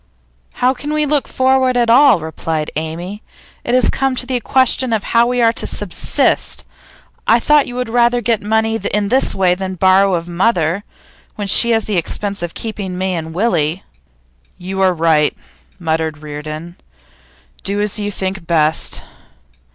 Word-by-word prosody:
'How 250 +1 +2
can 290 +3 -5
we 305 0 +1
look 290 -1 0
forward 260 -1 +2
at 240 -1 +2
all?' 240 - +6
replied 160 0 -3
Amy. 170 +6 -5 0.4
'It 240 - 0
has 255 - +4
come 270 -1 0
to 250 - -3
the 250 -1 -1
question 260 -1 +1
of 215 - 0
how 235 0 +3
we 245 -1 +1
are 230 0 +4
to - - -3
subsist. - - -1 0.6
I 230 - +5
thought 295 +4 +3
you 245 - -7
would 250 -1 -2
rather 240 +1 +2
get 230 -1 0
money 220 +1 +1
in 205 0 -1
this 260 +4 +3
way 185 -2 +3
than 190 0 -4
borrow 190 +1 +4
of 170 0 -4
mother 175 0 0 0.5
when 205 - -4
she 235 +4 +4
has 225 -1 +2
the 210 -3 -1
expense 200 +4 -2
of 175 -1 -5
keeping 200 -5 -5
me 190 0 -1
and 160 -2 -4
Willie.' 170 -3 0 0.7
'You 190 +2 -4
are 190 -1 +4
right,' 160 -3 +2 0.4
muttered 160 -3 -2
Reardon. 155 +3 -8 0.8
'Do 200 +1 -2
as 210 0 -1
you 205 0 -2
think 190 -3 -5
best. 160 -2 +1
200 Hz, 165 wpm, -17 LUFS, 170-240 Hz, 0.8 s, all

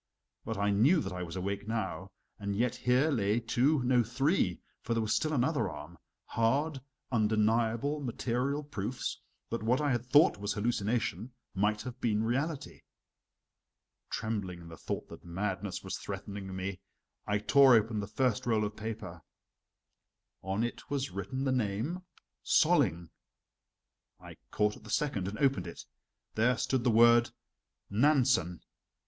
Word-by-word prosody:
But 110 - -3
I 100 +1 +1
knew 130 - +4
that 145 - -4
I 90 - -5
was 85 -1 -6
awake 100 +2 -3
now, 110 -4 -3 0.3
and 100 -1 -3
yet 120 +3 +1
here 130 +5 +2
lay 105 -3 +1
two 125 +5 +2
no, 125 0 +4
three 120 - +1 0.2
(for 115 - -2
there 115 - +1
was 110 - 0
still 155 - +1
another 140 - +1
arm) 80 +1 -10 0.3
hard, 135 +5 0 0.3
undeniable, 115 +5 +1
material 130 +2 -2
proofs 120 -3 -4 0.3
that 115 - -2
what 120 +4 +2
I 145 -2 +1
had 120 -2 0
thought 145 -1 +5
was 105 0 -2
hallucination, 115 0 -1 0.2
might 105 +2 0
have 125 0 -8
been 110 -2 +1
reality. 140 +6 -2 1.3
Trembling 100 -6 -3
in 85 - -11
the 80 - -9
thought - - -5
that - - -11
madness 95 +2 -3
was 95 - -4
threatening 100 -1 -6
me, 95 0 -4 0.5
I 105 - +2
tore 125 +5 +6
open 110 0 +2
the 100 - -4
first 120 +1 0
roll 110 -2 +2
of 105 0 -5
paper. 105 -6 -6 1.2
On 95 +4 -1
it 120 - -5
was 140 -5 -2
written 100 +8 -4
the 135 - +1
name: 125 - -1 0.4
"Solling." 85 0 +3 1.1
I - - -12
caught 105 0 +1
at - - -18
the 110 - -12
second 105 -7 0
and 105 +2 -5
opened 135 +1 +1
it. - - -9 0.5
There 120 +2 +2
stood 130 0 0
the 125 - +3
word: 120 +1 +6 0.6
"Nansen." 125 - +3
115 Hz, 150 wpm, -31 LUFS, 100-130 Hz, 1.3 s, tore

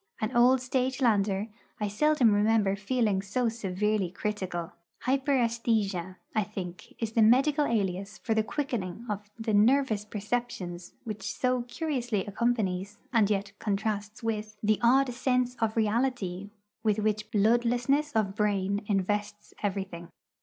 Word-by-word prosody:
An 220 +3 -2
old 250 +2 +5
stage 255 +1 -1
lander, 205 -4 +2 0.3
I 210 - 0
seldom 260 +2 +3
remember 205 -1 +3
feeling 210 -1 0
so 230 +5 0
severely 210 -2 -1
critical. 185 -3 -3 0.3
'Hyperæsthesia,' 230 -8 +1 0.2
I 215 - +2
think, 185 -4 -8
is 225 -2 -3
the 225 - +2
medical 275 +7 +5
alias 195 -2 -1
for 225 - -1
the 220 - +3
quickening 230 - -3
of 210 -1 -4
the 225 -1 -2
nervous 220 0 +3
perceptions 210 -5 -4
which 215 -2 -4
so 255 -1 0
curiously 245 - -2
accompanies, 205 -3 -1 0.2
and 220 -4 +4
yet 200 -1 -1
contrasts 210 +1 -2
with, 215 -1 -3
the 215 0 +3
odd 255 +2 +4
sense 250 0 +1
of 225 -1 -1
unreality 215 -4 0 0.3
with 215 -2 +2
which 215 0 -1
bloodlessness 240 +7 +2
of 210 -3 +1
brain 200 -1 0
invests 205 +1 -1
everything. 190 -4 -3
215 Hz, 130 wpm, -29 LUFS, 200-240 Hz, 0.3 s, old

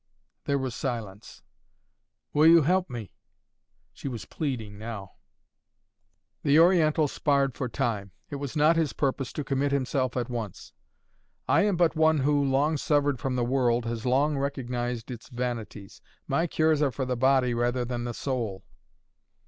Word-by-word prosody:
There 140 - +1
was 130 -3 -3
a - - -7
silence. 110 -6 -5 0.9
"Will 150 +2 +5
you 165 -1 +7
help 180 +3 +1
me?" 115 -6 -7 0.8
She - - -7
was 115 -7 -5
pleading 115 -9 -4
now. 110 -4 -7 1.3
The 145 +1 +4
Oriental 160 -3 +4
sparred 140 -2 +1
for 125 0 -4
time. 105 -5 -2 0.2
It 145 - -3
was 140 +1 -5
not 155 +2 +4
his 160 -3 +1
purpose 135 -2 -1
to 150 - -3
commit 140 0 0
himself 130 -2 0
at 120 -2 -1
once. 115 -6 -6 0.7
"I - - +4
am 200 -4 +1
but 170 -1 +3
one 160 0 +4
who, 145 +1 +2
long 140 +3 +2
severed 145 -2 +1
from 135 -2 -2
the 120 -1 0
world, 120 -2 +1
has 115 -1 -3
long 140 +3 +2
recognized 125 -3 -3
its 120 -1 -9
vanities. 120 -5 -5 0.3
My 170 - +1
cures 155 -1 +2
are 140 -3 +2
for 130 +2 -3
the 125 0 -1
body 130 0 +3
rather 120 +1 0
than 120 -1 -3
the 120 -1 -4
soul." 115 -8 -3
130 Hz, 160 wpm, -27 LUFS, 120-145 Hz, 1.3 s, you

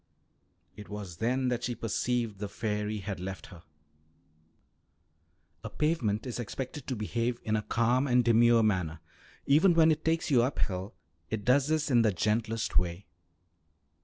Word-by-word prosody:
It 105 0 -11
was 100 -5 -7
then 125 +4 0
that 120 -1 -2
she 120 -1 -2
perceived 115 -1 -2
the 105 -1 -4
fairy 105 0 -3
had 100 -2 -5
left 95 +1 -6
her. 85 - -13 2.0
A 110 - -5
pavement 125 -8 -1
is 125 -1 -5
expected 130 +4 -6
to 130 - -2
behave 115 +2 -2
in 110 - 0
a 105 - 0
calm 120 +5 +1
and 125 -2 +3
demure 115 0 +5
manner; 90 -7 0 0.5
even 165 +5 +4
when 160 -1 +6
it 155 0 -1
takes 165 0 0
you 125 -4 +5
up 130 +3 -1
hill 95 +2 -3 0.3
it 110 -2 -4
does 135 +2 +3
this 155 -2 0
in 120 -2 +5
the 110 -2 +3
gentlest 110 +4 0
way. 90 +2 -4
115 Hz, 160 wpm, -29 LUFS, 105-125 Hz, 2.0 s, when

